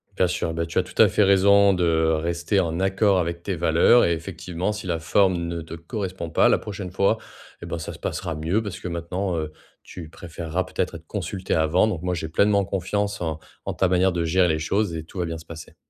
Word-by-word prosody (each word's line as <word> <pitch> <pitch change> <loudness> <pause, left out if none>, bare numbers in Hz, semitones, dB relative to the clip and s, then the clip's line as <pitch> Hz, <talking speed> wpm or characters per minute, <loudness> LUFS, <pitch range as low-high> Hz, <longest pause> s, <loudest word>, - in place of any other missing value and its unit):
Bien 90 - +3
sûr. 90 -2 -2
Bah, 85 0 -1
tu 85 - -1
as - - +2
tout - - -13
à - - +8
fait 105 - +3
raison 100 +1 +5
de 85 -3 +2
rester 85 +4 0
en 85 -2 -1
accord 95 0 +2
avec 85 0 -3
tes 100 - -2
valeurs 85 +8 +4
et 85 - +2
effectivement 85 +2 -4
si 105 -3 -6
la 85 -2 -1
forme 95 +4 +3
ne 85 0 -3
te 80 0 -8
correspond 90 +1 -5
pas, - - +4
la - - +4
prochaine 100 -3 -7
fois, 100 +4 +2 0.4
eh - - -7
ben, - - -3
ça 80 - -6
se - - -13
passera 85 -3 -3
mieux, 80 +8 0
parce 100 -4 -6
que - - -6
maintenant, 90 +2 -3
heu, 80 -1 -3 0.3
tu 85 -4 -10
préféreras 85 +1 -4
peut-être 90 -1 -3
être 85 0 -10
consultée 95 -1 -3
avant. 80 +5 +3
Donc 95 -7 -3
moi, 90 0 -1
j'ai 80 -1 -4
pleinement 100 +4 +3
confiance 100 +2 -2
en 80 -2 -2 0.3
en - - -2
ta 95 - +2
manière 95 +1 +3
de 85 -1 -1
gérer 90 +2 +3
les 80 -2 0
choses, 95 +3 0
et 80 - -4
tout 90 +4 -9
va 90 - 0
bien 80 0 -4
se 80 - -12
passer. 80 -1 -10
90 Hz, 240 wpm, -24 LUFS, 80-95 Hz, 0.4 s, à